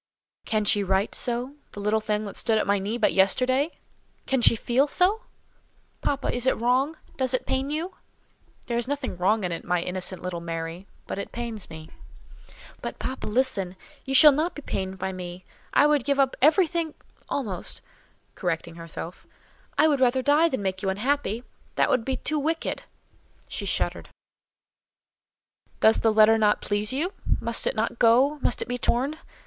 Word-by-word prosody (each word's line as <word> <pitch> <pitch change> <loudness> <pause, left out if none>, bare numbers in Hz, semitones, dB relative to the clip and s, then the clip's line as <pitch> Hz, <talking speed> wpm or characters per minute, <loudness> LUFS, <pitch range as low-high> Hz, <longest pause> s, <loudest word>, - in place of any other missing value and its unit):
"Can 215 -1 0
she 205 0 +3
write 190 +2 +1
so—the 245 0 -4
little 210 +2 +1
thing 215 0 -1
that 200 - -7
stood 225 -2 +1
at - - +1
my 200 0 +2
knee 205 +5 -2
but 220 - +2
yesterday? 255 - +2 0.5
Can 265 -2 +1
she 230 - +7
feel 245 +5 +2
so?" 400 - +1 0.8
"Papa, 280 -1 -1
is 245 +1 0
it - - +3
wrong? 255 +6 +2 0.2
Does 260 -1 +1
it - - -3
pain 265 +1 -1
you?" 320 +5 -3 0.7
"There 235 -1 -1
is 240 - -2
nothing 280 -6 -3
wrong 195 +4 +1
in 180 - -1
it, 165 - -4
my 180 0 +1
innocent 180 +1 -3
little 180 -2 -4
Mary; 165 +2 -5 0.2
but - - -5
it - - -6
pains 230 -4 -5
me." 160 0 -10 0.9
"But, - - -5
papa, 260 - -5
listen! 210 -6 +1 0.3
You 270 0 -2
shall 300 +3 +9
not 315 +5 -1
be 295 - -8
pained 190 -4 -3
by 190 - -3
me. 180 0 -8 0.3
I 290 - +5
would 295 -3 +3
give 280 +1 0
up 270 -1 +3
everything—almost" 310 - 0 0.5
(correcting 170 -2 -3
herself); 165 +1 -8 0.5
"I 315 - +6
would 295 -2 +3
die - - +4 0.3
rather 330 +2 +4
than 260 -9 -3
make 190 -1 -2
you 195 - 0
unhappy; 235 +2 -1 0.3
that - - +2
would 250 - +2
be 265 -1 -1
too 310 +3 0
wicked!" 320 +3 -2 0.7
She - - -5
shuddered. - - -1 1.7
"Does 220 +1 +5
the 225 - +3
letter 215 +1 +6
not 210 -1 +3
please 205 +2 -1
you? 320 +9 -2 0.3
Must - - -1
it - - 0
not - - -1
go? 260 +6 +4
Must 245 - 0
it - - -14
be 245 0 -3
torn? 270 +7 0
235 Hz, 175 wpm, -26 LUFS, 195-280 Hz, 1.7 s, shall